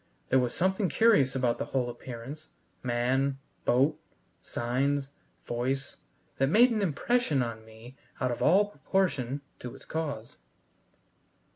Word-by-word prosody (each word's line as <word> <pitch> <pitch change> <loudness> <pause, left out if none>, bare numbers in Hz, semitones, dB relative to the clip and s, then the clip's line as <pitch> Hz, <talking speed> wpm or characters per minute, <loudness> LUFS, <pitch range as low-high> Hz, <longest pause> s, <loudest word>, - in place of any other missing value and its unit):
There 130 - +5
was 125 -1 0
something 190 +1 +1
curious 150 - +4
about 125 -3 +1
the - - -1
whole 130 -2 -1
appearance 130 +5 -8 0.3
man, 130 +3 +1 0.3
boat, 140 +5 +3 0.4
signs, 135 +4 -1 0.3
voice 130 +3 -2 0.4
that 135 0 +3
made 240 - +6
an 220 -2 0
impression 170 - +1
on 115 -2 -5
me 110 +3 -13 0.2
out 125 -1 +1
of 120 - -4
all 195 +6 +5
proportion 165 -10 -1 0.2
to 125 +1 -7
its 135 - -14
cause. 145 -8 -4
135 Hz, 130 wpm, -29 LUFS, 120-160 Hz, 0.4 s, made